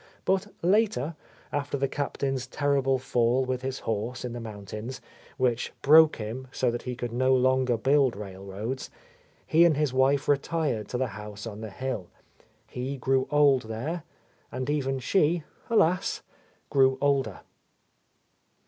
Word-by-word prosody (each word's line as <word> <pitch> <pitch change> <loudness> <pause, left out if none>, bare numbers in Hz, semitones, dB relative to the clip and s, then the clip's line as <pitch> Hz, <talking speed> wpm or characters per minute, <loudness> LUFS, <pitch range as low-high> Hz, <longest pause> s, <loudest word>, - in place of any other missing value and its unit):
But 190 +1 +1 0.2
later, 180 - +2 0.4
after 145 0 -2
the 135 0 +1
Captain's 135 -2 -2
terrible 135 -1 +1
fall 125 0 +1
with 130 -1 -2
his. 130 0 -4
horse 115 +3 -3
in 120 - -4
the 120 - -5
mountains, 110 +3 -7 0.4
which 125 -2 0
broke 155 +2 +7
him 115 +4 -6
so 125 -2 +1
that 120 - -4
he 125 -1 -4
could 120 -1 -4
no 130 +2 +3
longer 130 -1 +2
build 135 0 +3
railroads, 100 +5 -6 0.6
he 165 +2 +5
and 165 -4 +4
his 150 -4 +1
wife 135 +2 +2
retired 145 -6 0
to 125 - -3
the 130 - +1
house 105 0 -8
on 110 -1 -7
the 110 - -5
hill. 105 -3 -4 0.6
He 130 +3 -5
grew 130 0 +1
old 140 -6 +4
there, 145 +11 -3 0.3
— 120 - -37
and 130 +2 -2
even 135 -2 0
she, 160 +4 +2 0.3
alas! 185 -5 +2 0.5
grew 130 -1 +4
older. 140 -2 +1
130 Hz, 150 wpm, -27 LUFS, 120-145 Hz, 0.6 s, broke